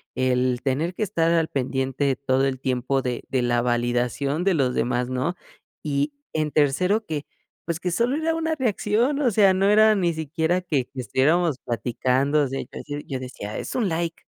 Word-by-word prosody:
el 125 -1 +1
tener 145 +6 0
que 215 - -1
estar 165 -5 +1
al 165 -1 +2
pendiente 135 +1 -1
todo 135 0 +1
el 135 -1 -1
tiempo 130 0 0
de 125 -2 -3
de 130 - +1
la 120 0 +2
validación 125 +5 0
de 195 0 +3
los 130 -4 +1
demás, 125 +1 0
¿no? 130 +7 -1 0.5
Y, 145 0 -1 0.2
en 155 -1 +1
tercero, 180 +9 +2
que, 150 -2 -4 0.4
pues, 170 0 -2
que 180 +1 -2
solo 235 +9 +1
era 320 +1 0
una 325 -1 -1
reacción, 245 +2 +1
o 255 - +3
sea, 200 -2 +5
no 195 +2 +2
era 215 +1 +6
ni 175 -4 +1
siquiera 160 +3 -1
que 150 -8 -1
que 130 0 -7
estuviéramos 155 +4 +2
platicando. 130 +5 0
O 140 - 0
sea, 135 +1 -4
yo - - -9
decio 145 0 -6
yo 130 -2 -3
decía: 125 -5 -7
"Es - - -6
un 235 -5 +1
like, 165 0 -3
145 Hz, 190 wpm, -24 LUFS, 130-180 Hz, 0.5 s, era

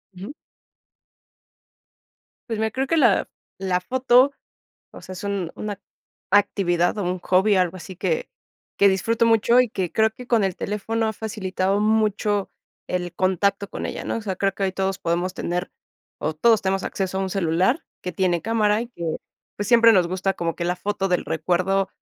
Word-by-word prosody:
Ujú. 195 +9 -8 2.2
Pues 225 - -2
mira, 220 0 0
creo 265 +4 -2
que 330 - +1
la 235 -10 +3 0.3
la 185 -2 0
foto, 255 +5 +3 0.6
o - - -11
sea, - - -10
es 185 - -8
un 200 -4 -3
una 205 -2 -5 0.5
actividad 195 -3 +2
o 200 - -1
un 180 0 -2
hobby, 190 +4 +3
algo 185 -1 +1
así 185 +1 -9
que 480 - -2 0.5
que 200 - +5
disfruto 220 +5 +1
mucho 230 +2 +4
y 250 - +2
que 190 -6 -3
creo 220 0 +3
que 250 +3 -12
con 230 -3 +2
el 190 -2 -1
teléfono 220 +2 -2
ha 220 - -1
facilitado 200 -3 -2
mucho 210 -2 +1 0.4
el 180 -1 -3
contacto 200 +2 0
con - - -4
ella, - - -5
¿no? - - -2
O - - -3
sea, 200 -4 -3
creo 195 +1 0
que 195 - -3
hoy 190 - 0
todos 190 0 -2
podemos 175 +2 -1
tener 180 -1 -3 0.5
o 155 - -2
todos 220 +7 +4
tenemos 195 0 -1
acceso 190 -1 -3
a - - 0
un 190 - -3
celular 185 - +1 0.2
que 180 - -3
tiene 175 -1 0
cámara 215 -1 +2
y 240 - -8
que, 170 -9 -4 0.4
pues, 205 0 -3
siempre 230 -1 +7
nos 180 -4 +3
gusta 190 +2 -1
como 165 -1 -3
que 170 - -3
la 175 +1 0
foto 195 +1 -2
del 180 -2 0
recuerdo 185 +4 0
195 Hz, 185 wpm, -23 LUFS, 185-220 Hz, 2.2 s, siempre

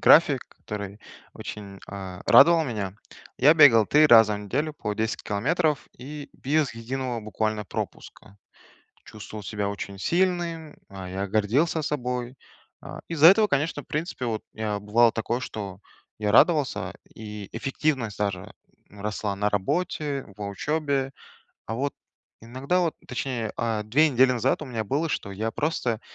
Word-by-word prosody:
график, - - +6
который 100 -1 -7 0.4
очень, 100 -2 -8
а, 95 -2 -7
радовал 165 +3 +7
меня: 105 -7 -4 0.4
я 150 +5 +6
бегал 120 -9 +7
3 155 +1 +5
раза 115 -5 +7
в 105 - -4
неделю 140 +10 -2
по 105 -7 -3
10 110 +1 -2
километров 150 - 0
и 145 +2 -8
без 145 -3 0
единого 125 +1 -4
буквально 110 0 -2
пропуска. 100 +1 -7 0.7
Чувствовал 110 0 -9
себя 100 0 -2
очень 100 -1 -6
сильным, 170 - 0
а, 95 -2 -8
я 95 +2 -3
гордился 115 - +1
собой. 125 -4 -3 0.5
А, - - -8
из-за 160 -1 +6
этого, 210 +4 +7
конечно, 145 -2 0
в - - -30
принципе, 150 -4 -3
вот, 110 -2 -2
я, 110 -1 -2
бывало 115 +3 +4
такое, 115 +2 -2
что 100 -6 -6 0.4
я 105 -1 0
радовался, 130 - +3 0.2
и 105 -2 -8
эффективность 130 -2 -1
даже, 100 -3 -3 0.4
ну, 100 0 -13
росла 105 -1 -2
на 105 +1 +1
работе, 145 - -1
в 105 - -12
учебе. 140 +5 -1 0.6
А, 110 - -3
вот, 140 +4 -2 0.5
иногда 130 +10 -1
вот, 170 -3 0
точнее, 125 -3 -3
а, 115 -2 -1
2 145 +9 +4
недели 130 -1 +4
назад 125 +4 0
у 150 - -6
меня 115 -3 -3
было, 145 +10 -1
что 100 - -3
я 110 +3 -2
просто 125 -7 -1
120 Hz, 150 wpm, -25 LUFS, 105-150 Hz, 0.7 s, радовал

